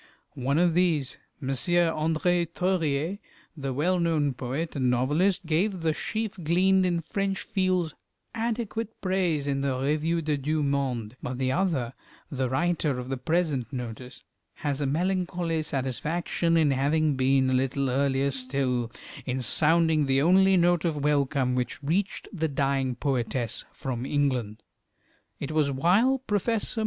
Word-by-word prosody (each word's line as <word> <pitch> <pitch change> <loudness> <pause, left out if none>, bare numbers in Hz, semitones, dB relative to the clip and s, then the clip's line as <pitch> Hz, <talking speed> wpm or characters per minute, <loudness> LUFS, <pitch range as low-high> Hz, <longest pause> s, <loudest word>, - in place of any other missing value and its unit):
One 140 +1 -1
of 175 0 +3
these, 165 -6 +1 0.2
M. 135 -3 -5
André 165 +4 +1
Theuriet, 170 -1 0 0.4
the 135 -3 -4
well 175 +8 +1
known 155 -5 +1
poet 135 +7 -4
and 130 -3 +1
novelist, 160 +10 +1
gave 180 +4 0
the 160 -1 +1
"Sheaf 215 +1 -4
gleaned 185 +3 +3
in 170 -2 0
French 195 +4 -2
Fields" 185 -4 0 0.4
adequate 225 -1 -3
praise 180 -6 0
in 140 -1 -1
the 135 -2 0
"Revue 155 +5 0
des 150 -1 0
Deux 150 +2 -1
Mondes;" 130 -5 -1
but 125 0 -4
the 130 0 0
other, 150 -8 0 0.4
the 130 -3 -1
writer 155 -1 0
of 125 0 -6
the 135 - -2
present 145 -4 -1
notice, 125 0 -7 0.3
has 145 -1 -3
a 140 - 0
melancholy 175 +1 0
satisfaction 155 +5 -1
in 155 -3 +4
having 145 +2 +2
been 130 0 +2
a - - +2
little 135 +1 0
earlier 135 +1 +1
still 130 -2 -1 0.4
in 130 +1 -1
sounding 160 +3 +3
the 135 0 +3
only 190 +5 +5
note 175 -1 +3
of 155 -5 -1
welcome 140 -3 +1
which 125 +3 -2
reached 185 +8 -1
the 160 -4 0
dying 135 -2 0
poetess 120 -3 -1
from 130 -1 -4
England. 130 -7 -1 0.8
It 140 - -4
was 155 -2 +2
while 185 - +3
Professor 215 +2 -1
W. - - +1
150 Hz, 145 wpm, -27 LUFS, 135-175 Hz, 0.8 s, only